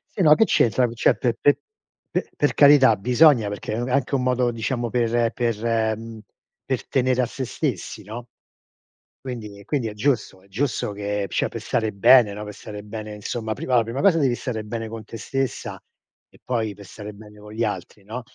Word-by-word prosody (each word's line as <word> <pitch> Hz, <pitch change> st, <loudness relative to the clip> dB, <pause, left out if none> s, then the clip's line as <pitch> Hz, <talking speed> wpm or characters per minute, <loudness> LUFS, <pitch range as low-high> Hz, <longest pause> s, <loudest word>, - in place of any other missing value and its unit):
Sì, 195 Hz, -, -1 dB
no, 150 Hz, -3 st, +7 dB
che 225 Hz, -, +4 dB
c'entra 125 Hz, -, +3 dB
co 115 Hz, -, -7 dB
cioè, 115 Hz, -, +3 dB
pe 120 Hz, -3 st, 0 dB
pe 145 Hz, -, +4 dB, 0.5 s
pe -, -, -2 dB
per 145 Hz, -, +2 dB
carità, 140 Hz, -5 st, +7 dB
bisogna, 125 Hz, +1 st, +4 dB
perché, 105 Hz, +1 st, -4 dB
mhmm, 120 Hz, +2 st, -2 dB
è -, -, -3 dB
anche 140 Hz, +1 st, +1 dB
un 130 Hz, -, 0 dB
modo, 125 Hz, -1 st, +1 dB
diciamo, 120 Hz, +1 st, -2 dB
per 120 Hz, -1 st, +1 dB
per, 115 Hz, -2 st, 0 dB
mhmm 115 Hz, 0 st, -9 dB, 0.5 s
per -, -, -2 dB
tenere 130 Hz, -1 st, +2 dB
a 125 Hz, -, 0 dB
se 130 Hz, -, -5 dB
stessi, 120 Hz, -, -3 dB
no. 115 Hz, +4 st, -8 dB, 1.0 s
Quindi 110 Hz, -6 st, -6 dB
e 100 Hz, -, -14 dB
quindi 135 Hz, -4 st, -1 dB
è 105 Hz, -, -5 dB
giusto 105 Hz, -5 st, -1 dB
è -, -, -22 dB
giusto 115 Hz, +1 st, -2 dB
che, 100 Hz, 0 st, -2 dB
cioè, -, -, 0 dB
per -, -, -7 dB
stare 110 Hz, -1 st, -1 dB
bene, 105 Hz, +3 st, +6 dB
no, 105 Hz, +1 st, -6 dB
per 105 Hz, -, -8 dB
stare 105 Hz, +1 st, -9 dB
bene, 105 Hz, 0 st, -7 dB
insomma, 110 Hz, +2 st, -4 dB
prima 130 Hz, -, -4 dB
la 120 Hz, -, +6 dB
prima 115 Hz, +4 st, -4 dB
cosa 180 Hz, -3 st, +4 dB
devi 130 Hz, -4 st, +2 dB
stare 115 Hz, -4 st, -4 dB
bene 115 Hz, +1 st, -5 dB
con 110 Hz, 0 st, -7 dB
te 115 Hz, -, -9 dB
stessa 135 Hz, +1 st, -3 dB, 0.5 s
e -, -, -22 dB
poi, 110 Hz, -5 st, -2 dB
per 100 Hz, -, -13 dB
stare 105 Hz, +2 st, -9 dB
bene 105 Hz, 0 st, -14 dB
con 105 Hz, 0 st, -12 dB
gli 110 Hz, +2 st, -2 dB
altri, 105 Hz, -1 st, -4 dB
no. 110 Hz, +5 st, -6 dB
115 Hz, 210 wpm, -23 LUFS, 105-125 Hz, 1.0 s, no